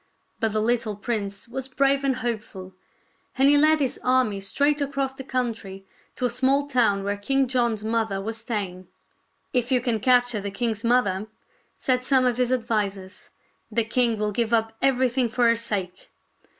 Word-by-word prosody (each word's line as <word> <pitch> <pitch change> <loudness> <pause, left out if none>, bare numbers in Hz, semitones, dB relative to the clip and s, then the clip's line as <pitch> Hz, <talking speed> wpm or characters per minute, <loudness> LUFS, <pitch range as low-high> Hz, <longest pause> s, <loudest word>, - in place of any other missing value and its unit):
But 225 -2 0
the 215 - +1
little 230 -2 0
prince 205 -2 -4
was 260 +2 -5
brave 275 +1 +1
and 270 -2 +1
hopeful, 215 -6 -5 0.6
and 270 +1 +5
he 290 - +6
led 310 +2 +4
his 270 -3 -1
army 250 -6 +2
straight 285 +9 +1
across 275 -1 -2
the 265 - -9
couhtry 225 -7 -4 0.3
to 255 - -1
a - - +2
small 265 +3 +2
town 230 -8 +2
where 200 +1 -2
King 270 +6 +1
John's 235 -4 0
mother' 220 -3 -1
was 220 +3 -4
staying. 200 -6 -4 0.3
" - - -45
If 245 -1 0
you 255 - +4
can 240 -3 -1
capture 245 -2 +3
the 200 - -4
king's 220 +2 -3
mother," 215 -5 +1 0.5
said 250 -1 0
some 260 -1 +3
of 245 -1 +1
his 250 0 +1
advisers, 205 -6 -2 0.2
" - - -43
the 230 - +2
king 230 0 +1
will 210 0 -1
give 230 +2 -1
up 225 -1 +2
everything 255 -2 +2
for 240 +1 +2
her 230 - +4
sake." 205 -6 -4
235 Hz, 180 wpm, -24 LUFS, 210-255 Hz, 0.6 s, he